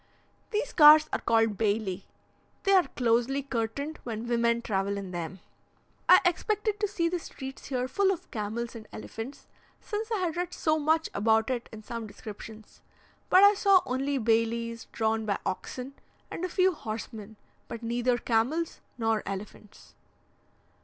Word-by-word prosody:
These 430 Hz, +1 st, -2 dB
cars 305 Hz, -1 st, +8 dB
are -, -, +1 dB
called 225 Hz, -3 st, +2 dB
baili. 205 Hz, -3 st, 0 dB, 0.6 s
They 395 Hz, -, +2 dB
are 370 Hz, -2 st, +5 dB
closely 245 Hz, +3 st, +1 dB
curtained 275 Hz, +4 st, -3 dB
when 225 Hz, -1 st, -5 dB
women 235 Hz, 0 st, +1 dB
travel 200 Hz, -1 st, -1 dB
in 195 Hz, -2 st, -6 dB
them. 175 Hz, +1 st, -5 dB, 0.7 s
I 365 Hz, -, +9 dB
expected 420 Hz, +4 st, 0 dB
to 420 Hz, -, +1 dB
see 360 Hz, -4 st, 0 dB
the 355 Hz, +1 st, -1 dB
streets 270 Hz, -4 st, -9 dB
here 255 Hz, -2 st, -1 dB
full 390 Hz, +8 st, +2 dB
of 365 Hz, -1 st, -6 dB
camels 225 Hz, +2 st, -3 dB
and 220 Hz, -2 st, -9 dB
elephants, 225 Hz, +5 st, -8 dB, 0.3 s
since 435 Hz, +2 st, -4 dB
I 440 Hz, -, +1 dB
had 355 Hz, -4 st, -1 dB
read 355 Hz, 0 st, -3 dB
so 310 Hz, 0 st, +1 dB
much 315 Hz, +2 st, +2 dB
about 220 Hz, +3 st, +2 dB
it 240 Hz, -2 st, -3 dB
in 220 Hz, -1 st, -10 dB
some 230 Hz, 0 st, -6 dB
descriptions: 215 Hz, +1 st, -11 dB, 0.5 s
but 370 Hz, +2 st, +7 dB
I 405 Hz, 0 st, +8 dB
saw 395 Hz, -2 st, +5 dB
only 275 Hz, +3 st, -1 dB
bailis 230 Hz, 0 st, 0 dB
drawn 220 Hz, -1 st, 0 dB
by 200 Hz, -, +1 dB
oxen 250 Hz, +7 st, -4 dB, 0.4 s
and 335 Hz, -, -5 dB
a 365 Hz, -, -1 dB
few 370 Hz, +1 st, +3 dB
horsemen, 220 Hz, -4 st, -7 dB, 0.3 s
but 230 Hz, 0 st, -7 dB
neither 240 Hz, +1 st, +1 dB
camels 250 Hz, +9 st, 0 dB, 0.2 s
nor 225 Hz, -2 st, +1 dB
elephants. 200 Hz, +1 st, -8 dB
235 Hz, 155 wpm, -28 LUFS, 220-320 Hz, 0.7 s, I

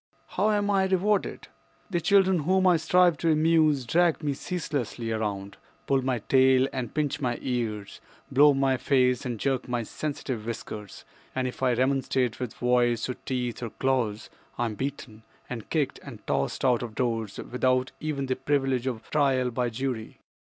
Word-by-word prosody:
How 215 Hz, -, +1 dB
am 205 Hz, -1 st, +1 dB
I 195 Hz, -1 st, +3 dB
rewarded? 190 Hz, +2 st, 0 dB, 0.4 s
"The 175 Hz, -2 st, 0 dB
children 190 Hz, -1 st, +4 dB
whom 185 Hz, +5 st, +2 dB
I 180 Hz, -2 st, +5 dB
strive 175 Hz, 0 st, +3 dB
to 165 Hz, -, +2 dB
amuse 155 Hz, -3 st, +3 dB
drag 170 Hz, +4 st, +2 dB
me 145 Hz, -1 st, 0 dB
ceaselessly 135 Hz, -8 st, -3 dB
around, 100 Hz, -3 st, -3 dB, 0.3 s
pull 135 Hz, -1 st, +2 dB
my 130 Hz, -1 st, 0 dB
tail 130 Hz, 0 st, +5 dB
and 125 Hz, -4 st, -3 dB
pinch 145 Hz, -1 st, -1 dB
my 120 Hz, -3 st, 0 dB
ears, 110 Hz, -5 st, -3 dB, 0.3 s
blow 145 Hz, +3 st, +7 dB
in 135 Hz, -1 st, +2 dB
my 135 Hz, -1 st, +2 dB
face 125 Hz, 0 st, +2 dB
and 120 Hz, -3 st, -4 dB
jerk 135 Hz, 0 st, -1 dB
my 120 Hz, -1 st, -1 dB
sensitive 130 Hz, -3 st, -4 dB
whiskers; 105 Hz, -3 st, -7 dB, 0.3 s
and 130 Hz, -1 st, 0 dB
if 125 Hz, -, -7 dB
I 130 Hz, -2 st, +3 dB
remonstrate 130 Hz, -1 st, 0 dB
with 125 Hz, -3 st, -4 dB
voice 120 Hz, -1 st, +2 dB
or -, -, -1 dB
teeth 125 Hz, -2 st, -4 dB
or 120 Hz, -, -3 dB
claws, 115 Hz, -4 st, -1 dB, 0.3 s
I 120 Hz, -, 0 dB
am 115 Hz, -, -2 dB
beaten 130 Hz, -3 st, -5 dB, 0.3 s
and 115 Hz, -4 st, -7 dB
kicked 150 Hz, -5 st, -1 dB
and -, -, -11 dB
tossed -, -, -1 dB
out 125 Hz, -3 st, +3 dB
of 115 Hz, -3 st, -6 dB
doors 115 Hz, -4 st, -2 dB
without 130 Hz, +1 st, 0 dB
even 150 Hz, -3 st, -2 dB
the 130 Hz, -1 st, -1 dB
privilege 135 Hz, -3 st, 0 dB
of 115 Hz, -4 st, -4 dB
trial 135 Hz, -4 st, +2 dB
by 125 Hz, 0 st, -1 dB
jury. 115 Hz, -1 st, -4 dB
130 Hz, 175 wpm, -27 LUFS, 120-150 Hz, 0.4 s, blow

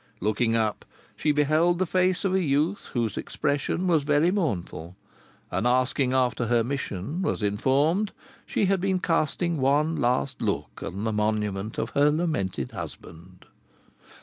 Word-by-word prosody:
Looking 110 Hz, +3 st, +1 dB
up 110 Hz, -2 st, 0 dB, 0.3 s
she 150 Hz, -, +1 dB
beheld 155 Hz, +4 st, +3 dB
the 185 Hz, -, +1 dB
face 185 Hz, +2 st, +1 dB
of 190 Hz, -, +1 dB
a 190 Hz, -, +3 dB
youth 155 Hz, +5 st, 0 dB
whose 115 Hz, -4 st, -1 dB
expression 145 Hz, +5 st, -1 dB
was 165 Hz, -4 st, +3 dB
very 150 Hz, +4 st, +3 dB
mournful, 95 Hz, -, -3 dB, 0.6 s
and 120 Hz, -, 0 dB
asking 130 Hz, +1 st, +2 dB
after 125 Hz, -2 st, +1 dB
her 120 Hz, 0 st, +3 dB
mission, 135 Hz, -, -3 dB
was 185 Hz, -, -1 dB
informed 140 Hz, -, +1 dB, 0.4 s
she 205 Hz, -, +1 dB
had 190 Hz, -1 st, +1 dB
been 190 Hz, 0 st, +1 dB
casting 170 Hz, 0 st, 0 dB
one 145 Hz, +4 st, +2 dB
last 125 Hz, +3 st, 0 dB
look 75 Hz, -, -3 dB
on 95 Hz, +4 st, -5 dB
the 110 Hz, -1 st, -1 dB
monument 105 Hz, -1 st, -1 dB
of -, -, -2 dB
her 145 Hz, +1 st, +4 dB
lamented 145 Hz, -, -1 dB
husband. 90 Hz, +3 st, -10 dB
140 Hz, 150 wpm, -26 LUFS, 110-165 Hz, 0.6 s, her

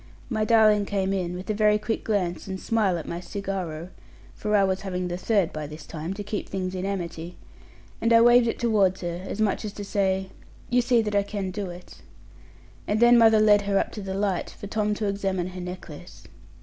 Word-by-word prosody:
My 215 Hz, -2 st, +1 dB
darling 215 Hz, -3 st, +4 dB
came 195 Hz, -1 st, 0 dB
in, 180 Hz, -2 st, -2 dB
with 185 Hz, +1 st, -7 dB
a -, -, 0 dB
very 210 Hz, 0 st, +3 dB
quick 215 Hz, +1 st, -3 dB
glance 185 Hz, -5 st, -1 dB
and 190 Hz, -1 st, -4 dB
smile 210 Hz, -5 st, +1 dB
at 160 Hz, -, -7 dB
my 170 Hz, -, -4 dB
cigarro 180 Hz, -4 st, -5 dB, 0.4 s
(for 210 Hz, 0 st, -1 dB
I 200 Hz, -, +5 dB
was 190 Hz, -1 st, 0 dB
having 180 Hz, -2 st, -3 dB
the 175 Hz, -, -2 dB
third 195 Hz, -1 st, +1 dB
by 155 Hz, -1 st, -4 dB
this 150 Hz, 0 st, -10 dB
time, 165 Hz, +4 st, -5 dB
to 205 Hz, -, -5 dB
keep 205 Hz, +1 st, -4 dB
things 185 Hz, -1 st, -3 dB
in 185 Hz, +1 st, -3 dB
amity); 175 Hz, -3 st, -5 dB, 0.6 s
and 230 Hz, -, +2 dB
I 230 Hz, -, +7 dB
waved 240 Hz, 0 st, +6 dB
it 230 Hz, -, -1 dB
towards 200 Hz, -5 st, +2 dB
her, 175 Hz, 0 st, -4 dB
as 195 Hz, -, -6 dB
much 215 Hz, -1 st, +1 dB
as 210 Hz, -2 st, -5 dB
to 205 Hz, -, -7 dB
say, 190 Hz, -1 st, 0 dB, 0.4 s
'you 245 Hz, 0 st, +4 dB
see 240 Hz, -1 st, +3 dB
that 210 Hz, -1 st, -3 dB
I 200 Hz, -, +4 dB
can 200 Hz, -2 st, -4 dB
do 195 Hz, -1 st, -4 dB
it.' 175 Hz, +1 st, -12 dB, 0.9 s
And 210 Hz, +1 st, +1 dB
then 240 Hz, +1 st, +7 dB
mother 225 Hz, -2 st, +6 dB
led 210 Hz, -1 st, +5 dB
her 200 Hz, -1 st, +2 dB
up -, -, 0 dB
to 210 Hz, -, -7 dB
the 190 Hz, -1 st, -4 dB
light, 195 Hz, -3 st, -1 dB
for -, -, -7 dB
Tom 210 Hz, 0 st, -1 dB
to 210 Hz, -, -3 dB
examine 195 Hz, -3 st, -1 dB
her 180 Hz, 0 st, -8 dB
necklace. 180 Hz, -1 st, -9 dB
195 Hz, 220 wpm, -25 LUFS, 180-215 Hz, 0.9 s, I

